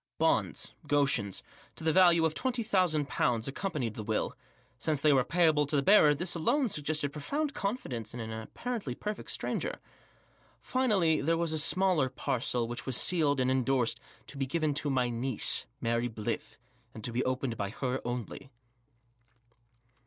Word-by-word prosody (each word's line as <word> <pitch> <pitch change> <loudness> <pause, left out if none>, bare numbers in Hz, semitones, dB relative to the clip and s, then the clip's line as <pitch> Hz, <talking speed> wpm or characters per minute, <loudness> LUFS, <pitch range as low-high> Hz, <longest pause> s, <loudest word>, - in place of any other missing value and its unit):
Bonds - - 0
— - - -40
" - - -20
Goschens 135 -9 +1
" - - -23
— - - -30
to - - -9
the 160 -1 +2
value 175 -3 +6
of 160 - +1
£20,000 195 - +1
accom 135 - -1
panied 125 -9 -2
the 110 - -6
will; 110 +1 -1 0.4
since 155 +3 0
they 150 +1 +4
were 130 -2 +4
payable 155 -1 +3
to 145 0 +2
bearer 155 -5 +6
this 175 +4 -2
alone 250 - +1
suggested 150 -3 -1
profound 285 - -2
confidence 135 - -3
in 120 - -7
an 110 -1 -5
apparently 135 - -5
perfect 210 +7 -5
stranger. - - -2 0.8
Finally, 200 -12 +2
there 165 +4 +1
was 165 -1 -1
a 155 - 0
smaller 180 -4 +2
parcel 125 -2 -1
which 120 +2 -6
was 130 - +1
sealed 150 -6 +2
and 130 0 +2
endorsed 130 -2 +1 0.2
" 110 - -29
To 140 - -9
be 135 - 0
given 155 0 0
to 145 +1 0
my 125 -3 +1
niece, 120 0 +1
Mary 115 +1 0
Blyth, 110 0 -4 0.4
and 110 - -9
to 120 - -2
be 120 +2 0
opened 130 -2 -1
by 100 -2 -3
her 125 +4 -3
only." 120 +2 -5
140 Hz, 175 wpm, -30 LUFS, 120-170 Hz, 0.8 s, value